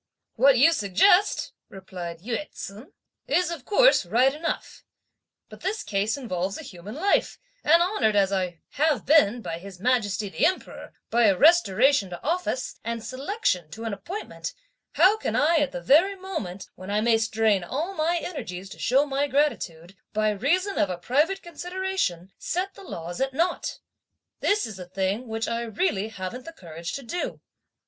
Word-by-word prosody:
"What 275 -2 +5
you 315 +7 +6
suggest," 330 - +3 0.2
replied 180 -3 -8
Yü 240 +8 -3
ts'un, 220 - -9 0.4
"is, 355 -1 +2
of 320 -7 -6
course, - - +5
right 240 +9 +3
enough; 320 +3 -4 0.6
but - - -13
this 395 +4 -2
case 205 +4 -1
involves 195 -7 -3
a - - -8
human 190 +5 -9
life, 390 +7 +1 0.3
and 335 +3 +5
honoured 245 - +1
as 195 -1 +3
I 180 -3 -2
have 305 0 +1
been, 245 -6 +4
by 165 0 -4
His 190 0 -11
Majesty 215 -3 +1
the 195 - -3
Emperor, 365 +4 -1 0.2
by 235 0 +4
a 195 -2 +3
restoration 275 - +4
to 175 -1 -8
office, 330 -5 -2
and 230 0 -4
selection 255 - -1
to 225 +8 -8
an 225 -2 -3
appointment, 340 - -6 0.4
how 410 +4 +5
can - - -2
I 325 +3 +4
at 295 -3 +1
the 175 - -5
very 325 - +4
moment, 320 - -6
when 185 +1 -10
I 205 +1 +1
may 225 0 +3
strain 220 -3 +2
all 305 - -3
my 335 0 +1
energies 195 - -6
to - - -11
show 270 +4 +3
my 280 0 0
gratitude, 195 - -1 0.2
by 215 0 +2
reason 345 - 0
of 200 - +2
a 180 - -3
private 295 - +1
consideration, 345 - -3
set 370 +3 -2
the - - -13
laws 175 - -6
at 265 0 -1
nought? 340 +4 -1 0.6
This 420 +1 +2
is 215 -4 -8
a 180 - -7
thing 195 +6 -2
which 225 0 -3
I 230 0 -1
really 220 - -1
haven't 220 +4 -7
the 330 - -9
courage 170 - -7
to 275 - -5
do." 345 +9 -4
240 Hz, 170 wpm, -25 LUFS, -, 0.6 s, you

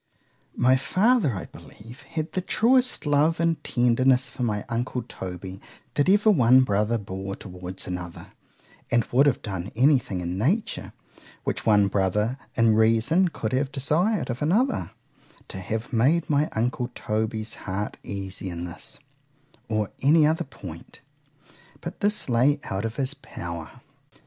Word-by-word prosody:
My 130 +1 +4
father, 180 - +2
I 90 - -5
believe, 115 +5 -14
had 160 -1 -5
the 185 - -1
truest 250 +6 +2
love 150 +3 +3
and 165 -1 +1
tenderness 130 +2 +2
for 130 - -8
my 105 -4 -1
uncle 120 +1 -2
Toby, 95 -3 -7 0.3
that 145 +4 +2
ever 205 +2 +5
one 130 - +6
brother 105 0 +1
bore 95 -1 -5
towards 90 -1 -8
another, 90 -1 -7 0.6
and 120 -1 +3
would 135 +4 +5
have 135 - +1
done 95 -2 -4
any 135 +4 +5
thing 95 -6 -5
in 90 +2 -3
nature, 180 - -1 0.5
which - - -3
one 105 -2 +5
brother 105 +6 0 0.2
in 115 -2 +4
reason 115 - +3
could 115 -9 -4
have 135 +1 0
desir'd 155 - +1
of 120 - -6
another, 220 - +1 0.6
to 95 - -6
have 110 +6 -4
made 145 +9 +3
my 150 +1 +2
uncle 120 +2 -1
Toby's 110 +1 -2 0.2
heart 100 +3 -3
easy 95 -1 -6
in 85 0 -5
this, 90 +1 -6 0.7
or 110 -2 -1
any 150 +3 +5
other 160 +2 +1
point. - - -11 0.8
But - - -7
this 210 +1 +1
lay 130 +4 +3
out 95 +3 -3
of 115 0 -4
his 135 0 -1
power. 85 - -7
120 Hz, 150 wpm, -25 LUFS, 105-150 Hz, 0.8 s, one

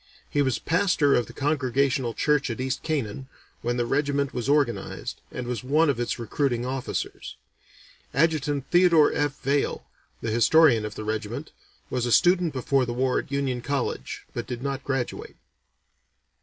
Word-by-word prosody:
He 145 - 0
was 130 -3 +1
pastor 165 -5 +2
of 120 - +2
the - - -10
Congregational 135 -3 0
church 150 -3 +1
at 115 - -4
East 130 0 -2
Canaan 135 -5 -3 0.3
when 120 +1 -1
the 120 - +1
regiment 140 +1 0
was 125 +2 -3
organized, 140 -9 0
and 125 - -5
was 120 -2 -3
one 150 +4 +3
of 125 - -5
its 120 - -1
recruiting 120 +1 -1
officers. 130 0 -4 0.8
Adjutant 145 -2 +1
Theodore 175 -4 +5
F. 145 -1 -1
Vaill, 140 +1 0 0.4
the 115 - -3
historian 120 0 +5
of 105 0 -6
the 110 - -5
regiment, 110 0 -4 0.4
was 125 -1 0
a - - -1
student 175 +3 +4
before 130 -1 +1
the 120 - -2
war 130 0 +1
at - - -8
Union 135 -3 -1
College, 135 - -3
but - - -4
did 125 0 -5
not 135 -1 -3
graduate. 135 -3 -3
135 Hz, 160 wpm, -25 LUFS, 120-145 Hz, 0.8 s, Theodore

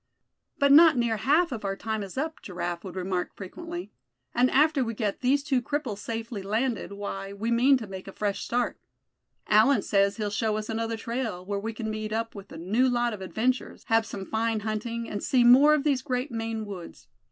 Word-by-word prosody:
"But 280 0 +4
not 310 -1 +8
near 235 -2 +1
half 305 - +3
of 230 -4 -5
our 195 -1 -1
time 220 +1 -3
is 195 +4 -8
up," 315 +3 -3
Giraffe 175 -2 -4
would 190 -2 -8
remark 185 -1 -2
frequently; 340 - -7 0.4
"and 250 +2 +3
after 300 -1 +3
we 230 -1 -4
get 210 -3 -2
these 275 +2 +2
two 270 -4 +1
cripples 245 -5 -3
safely 225 -1 -5
landed, 215 +1 -1
why, 200 -1 -5
we 220 +4 -3
mean 255 +4 +5
to 230 - -6
make 190 -1 -8
a - - -6
fresh 205 0 -2
start. 245 +1 -1 0.7
Allan 220 +7 +4
says 200 0 +2
he'll 210 -2 -2
show 215 0 0
us 215 0 -5
another 225 0 -2
trail, 225 -5 -4
where 200 +1 -2
we 225 +3 -3
c'n 220 -1 -4
meet 215 0 -4
up 225 +1 -2
with 200 -1 -11
a - - -8
new 215 +10 +2
lot 240 -1 +1
of 205 - -7
adventures, 245 +7 -2
have 225 -1 +3
some 195 -1 -6
fine 225 0 -1
hunting, 230 +2 -3
and 205 - -4
see 255 -2 +3
more 270 +5 +7
of 290 - -1
these 280 -4 +2
great 255 0 -2
Maine 225 -1 -3
woods. 190 -5 -9
225 Hz, 210 wpm, -27 LUFS, 205-255 Hz, 0.7 s, not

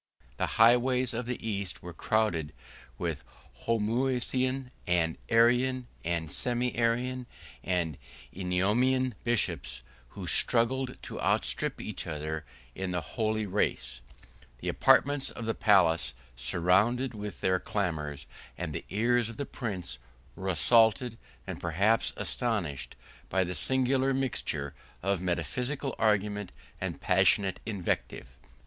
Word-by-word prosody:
The - - 0
highways 125 +2 +4
of 115 +1 -3
the 125 -2 -4
East 100 -3 -2
were 90 0 -7
crowded 90 -6 0 0.4
with - - -3 0.4
Homoousian, 125 +3 0 0.2
and 85 -2 +2
Arian, 125 +2 +4 0.2
and 80 -2 -1
Semi 125 - +1
Arian, 120 +2 0 0.4
and 85 -6 -1 0.3
Eunomian 110 +8 +1
bishops, 85 - -1 0.3
who - - -5
struggled 125 +2 +2
to - - -6
outstrip - - 0
each - - -5
other 75 -1 -4 0.3
in 95 +4 -4
the 90 -1 -1
holy 110 -1 0
race: 65 -11 -1 0.6
the - - -4
apartments 145 0 +4
of 115 - -7
the 115 - 0
palace 85 - +3 0.4
resounded 110 +10 +2
with 105 -3 -7
their 95 0 +2
clamors; 75 -9 -3 0.3
and - - -4
the - - -5
ears 120 +2 +2
of 115 - -9
the 140 - -2
prince 90 - -4 0.4
were 95 0 -4
assaulted, 115 +5 +4 0.3
and - - -6
perhaps 100 +7 +2
astonished, 100 - -2 0.3
by 95 - +2
the 90 0 -3
singular 130 - +2
mixture 80 - -1 0.3
of 100 -2 +1
metaphysical 125 - -1
argument 105 -2 +1 0.3
and - - -4
passionate 95 +1 +3
invective. 95 -10 -2
110 Hz, 120 wpm, -29 LUFS, 90-125 Hz, 0.6 s, highways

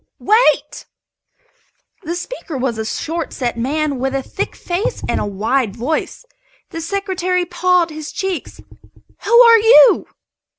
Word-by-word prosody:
"Wait!" 440 +4 +1 1.1
The 340 -1 -4
speaker 350 - -6
was 250 -3 -2
a 220 - -3
short 325 +8 -4
set 245 -3 -3
man 280 +3 -2
with 265 +1 -2
a 270 - -2
thick - - -5
face 405 +8 -3
and - - -1
a - - -2
wide 215 +2 -1
voice. 290 - -3 0.5
The 330 - -5
Secretary 365 0 -2
paled 355 -1 +1
his 310 -1 -7
cheeks. 380 -3 -5 0.7
"Who 470 +1 +6
are 460 -1 +7
you?" 455 +2 +6
335 Hz, 135 wpm, -17 LUFS, 265-385 Hz, 1.1 s, are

